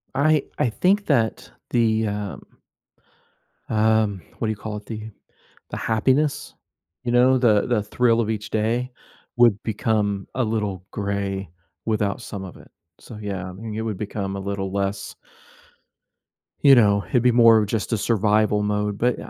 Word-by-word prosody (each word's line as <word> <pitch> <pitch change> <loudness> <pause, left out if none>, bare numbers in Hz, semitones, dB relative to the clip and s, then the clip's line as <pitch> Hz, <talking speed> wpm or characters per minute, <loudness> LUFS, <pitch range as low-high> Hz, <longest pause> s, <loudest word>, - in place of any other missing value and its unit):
I 150 +1 +3
I 125 - +1
think 195 - +1
that 110 -2 0 0.2
the, 110 -2 +2
um 105 -1 -5 1.3
um, 110 -3 +2 0.2
what 115 - -1
do - - -1
you 110 - -1
call 105 0 -6
it? 105 - -11
The 110 -1 -7 0.6
the - - -5
happiness, 130 +7 0 0.5
you 120 - -1
know, 125 +2 +5
the 110 -5 +3
the 115 -4 +1
thrill 115 +2 +2
of 110 -2 0
each 105 -1 -4
day 115 +4 -1 0.5
would 120 -3 +4
become 105 -3 -1
a 130 - +1
little 105 -5 -2
gray 100 -2 -3 0.4
without 105 -2 0
some 100 -4 -7
of 95 - -10
it. - - -17 0.3
So, 115 - -11
yeah, 100 -3 -4
I - - -7
mean, 105 +3 -7
it 110 - -2
would 110 -2 -3
become 100 -1 -4
a - - -4
little 95 -1 -3
less 100 0 -3 1.5
you 140 -2 +8
know, 100 -5 +4
it'd 120 +5 +1
be 125 - +5
more 115 -1 +6
of 105 - 0
just 110 +2 -2
a - - +2
survival 105 -1 +2
mode, 105 0 -1
but, 120 +2 +1
110 Hz, 165 wpm, -23 LUFS, 100-115 Hz, 1.5 s, you